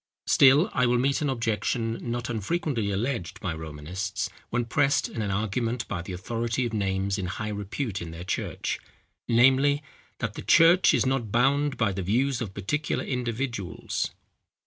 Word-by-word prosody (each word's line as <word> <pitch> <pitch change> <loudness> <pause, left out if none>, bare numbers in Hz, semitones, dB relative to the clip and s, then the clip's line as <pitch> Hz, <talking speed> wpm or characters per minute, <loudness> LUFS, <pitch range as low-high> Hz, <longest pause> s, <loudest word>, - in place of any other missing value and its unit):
Still 140 +6 +6
I 125 -1 +3
will 120 0 +3
meet 135 +4 +1
an 145 - +1
objection 115 -1 -1
not 120 0 -2
unfrequently 120 - -1
alleged 100 -3 -2
by 95 -5 -2
Romanists, 80 +5 -4 0.2
when 120 0 0
pressed 140 +4 +2
in 115 - -5
an 105 - -1
argument 115 +4 -1
by 95 -3 -3
the 90 - -8
authority 115 +6 -2
of 115 - -4
names 95 -1 0
in 95 - -2
high 105 +4 -4
repute 105 +1 -3
in 85 - -6
their 85 +1 -7
church, 90 - -2 0.5
namely, 135 +5 +4 0.3
that 115 -3 -3
"the - - -7
church 170 +2 +6
is - - +2
not 130 -5 0
bound 140 +4 +2
by 110 -3 +2
the 95 0 -3
views 125 +8 +1
of 100 -5 -5
particular 150 +11 -1
individuals." 120 -5 -3
115 Hz, 165 wpm, -27 LUFS, 100-130 Hz, 0.5 s, Still